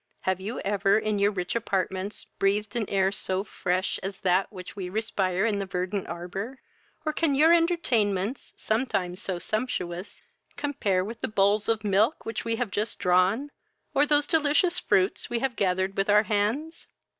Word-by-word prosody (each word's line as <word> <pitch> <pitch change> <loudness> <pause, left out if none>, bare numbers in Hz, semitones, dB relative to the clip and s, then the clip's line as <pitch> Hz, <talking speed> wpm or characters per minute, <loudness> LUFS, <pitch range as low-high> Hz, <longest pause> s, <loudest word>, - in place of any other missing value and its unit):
Have 190 0 -1
you 215 +6 -4
ever 200 0 +2
in 215 -1 0
your 200 +1 +4
rich 180 -3 -3
apartments 195 -2 -2
breathed 205 +3 +1
an 225 -4 -1
air 190 -1 +2
so 190 -1 -1
fresh 185 -2 -1
as 195 +1 -5
that 185 +2 +2
which 185 -3 -9
we 185 -3 -5
respire 195 -2 0
in 210 -3 +1
the 195 - -3
verdant 185 +1 -2
arbour? 190 +9 -5 0.5
or 310 - 0
can 300 -3 +1
your 315 +4 +6
entertainments, 250 - +1
sometimes 205 -6 -1
so 185 -3 -2
sumptuous, 185 -2 -3 0.3
compare 210 -11 0
with 230 +2 -7
the - - -1
bowls 205 +1 +2
of 225 -1 +1
milk 210 +8 +2
which 225 - -3
we 230 0 -1
have 235 -3 -2
just 210 +3 -1
drawn, 185 +10 +2 0.4
or 290 +2 +3
those 290 -1 +3
delicious 320 +3 +2
fruits 190 +1 +1
we 240 - 0
have 250 0 -1
gathered 190 -1 0
with 195 +1 0
our 210 +1 +6
hands? 225 +11 -1
205 Hz, 170 wpm, -27 LUFS, 190-235 Hz, 0.5 s, your